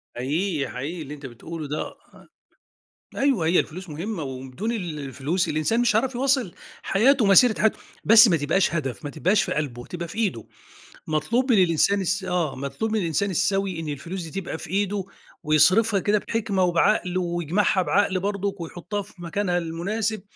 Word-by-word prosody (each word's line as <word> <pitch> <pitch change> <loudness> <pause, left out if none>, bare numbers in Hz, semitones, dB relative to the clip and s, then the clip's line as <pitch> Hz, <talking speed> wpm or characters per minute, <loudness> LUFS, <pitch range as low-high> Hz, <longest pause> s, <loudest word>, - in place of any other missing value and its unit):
حقيقي 150 +5 -1
حقيقي، 155 +7 -5
اللي 145 0 -7
أنتَ 145 -1 -10
بتقوله 150 +5 -7
ده. 150 +2 -2 0.3
آ - - -17 0.9
أيوه، 265 - +1
هي 175 +2 +4
الفلوس 180 +2 -5
مهمَّة، 170 +3 -4
وبدون 135 - -5
ال 175 -9 -4
الفلوس 140 +6 -2
الإنسان 155 +10 0
مش 225 -3 +2
هيعرَف 250 +3 +1
يواصِل 260 -7 +1 0.3
حياته، 245 +4 +3
مسيرة 215 +4 +5
حياته، 220 - +2 0.2
بس 225 +1 +8
ما 170 -5 +3
تبقاش 165 +5 +1
هدَف، 130 -10 -3
ما 145 - -3
تبقاش 185 +6 +2
في - - -2
قلبه، 125 -5 -3
تبقى 170 -1 -6
في 205 - -10
إيده. 190 - -1 0.6
مطلوب 230 - +1
من 195 -5 +6
الإنسان 180 +4 +2
الس 190 +2 -1
آه، 175 -5 -1
مطلوب 140 +11 -3
من 220 - +1
الإنسان 195 +3 0
السوي 195 -1 0
إن 160 - -5
الفلوس 170 +6 -5
دي 195 +5 -4
تبقى 165 - -5
في 165 - -9
إيده، 200 +1 -1 0.4
ويصرَفها 185 +8 +4
كده 205 +3 +2
بحِكمة 210 -4 0
وبعقل، 180 +1 +2
ويجمَعها 175 +2 +1
بعقل 190 0 +1
برضه، 200 0 -2
ويحُطَّها 175 +5 -5
في 205 +2 -13
مكانها 175 +1 -1
المناسِب. 195 +6 -2
180 Hz, 170 wpm, -24 LUFS, 155-205 Hz, 0.9 s, بس